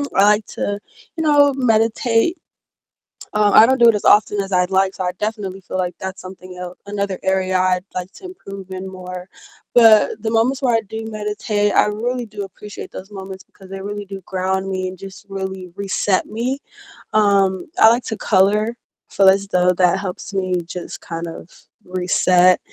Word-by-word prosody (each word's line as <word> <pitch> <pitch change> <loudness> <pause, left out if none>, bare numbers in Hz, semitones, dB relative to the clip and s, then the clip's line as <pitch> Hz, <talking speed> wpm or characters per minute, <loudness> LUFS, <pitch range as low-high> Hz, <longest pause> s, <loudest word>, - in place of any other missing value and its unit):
I 195 - +5
like 210 +1 +4
to, 205 0 -3 0.4
you 320 - -1
know, 290 -2 +5
meditate. 230 +5 +2 1.0
Um, 210 -1 +3
I 220 - +9
don't 260 +2 +2
do 235 - +7
it 230 - +6
as 205 - -3
often 210 0 +4
as 195 0 -6
I'd 180 -1 +2
like, 190 0 +2
so 185 - -3
I 180 - 0
definitely 205 -3 -4
feel 185 - -6
like 180 -1 -2
that's 190 0 -6
something 185 0 -11
el 180 0 -7
another 200 -2 -3
area 190 -1 +1
I'd 185 0 +1
like 185 +1 -4
to - - -13
improve 195 - -10
in 185 0 -5
more, 180 0 -8 0.4
but 220 -2 +5
the 220 - -2
moments 230 +5 +1
where 250 -4 +2
I 225 - +2
do 220 +1 -7
meditate, 210 -1 -1
I - - +5
really 240 +4 -2
do 210 -2 -7
appreciate 200 +1 -10
those 190 - -9
moments, 190 -1 -9
because 190 -1 -17
they 195 0 -6
really 205 +1 -5
do 195 0 -8
ground 190 +1 -2
me 185 -1 -2
and 185 - -10
just 195 +1 -11
really 190 -2 -5
reset 195 -1 0
me. 245 +5 -3 0.5
Um, 195 -3 +2
I 220 - +8
like 240 +2 +2
to 220 - -4
color, 210 +3 +2 0.3
feel 195 -1 +5
as 195 +1 +2
though 180 -1 +3
that 180 0 +3
helps 190 +1 -6
me 185 -2 -1
just 180 +1 -7
kind 170 0 -6
of 165 +1 -9 0.4
reset. 180 0 +3
195 Hz, 185 wpm, -19 LUFS, 185-215 Hz, 1.0 s, I